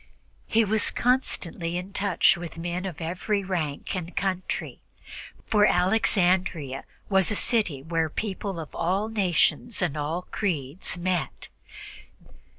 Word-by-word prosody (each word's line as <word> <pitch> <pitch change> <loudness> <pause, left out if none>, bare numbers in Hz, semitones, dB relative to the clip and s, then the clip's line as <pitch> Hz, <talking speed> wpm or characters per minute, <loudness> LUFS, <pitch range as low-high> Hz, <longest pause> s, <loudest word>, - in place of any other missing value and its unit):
He 225 0 +3
was 215 +1 +2
constantly 175 -9 0
in 185 +2 -6
touch 195 -1 +4
with 170 -2 -7
men 175 +3 -3
of 170 -3 -7
every 185 +5 -1
rank 170 -4 -2
and 180 -1 -5
country, 190 -2 -2 0.7
for 210 -1 +4
Alexandria 180 -7 +2 0.2
was 190 -3 +3
a 210 - +1
city 190 - +1
where 165 0 0
people 195 0 -3
of 155 - -7
all 195 +6 0
nations 210 +3 +2
and 175 -6 0
of 150 - -2
all 160 +5 -2
creeds 170 -3 -2
met. 180 -1 -2
180 Hz, 130 wpm, -26 LUFS, 165-200 Hz, 0.7 s, touch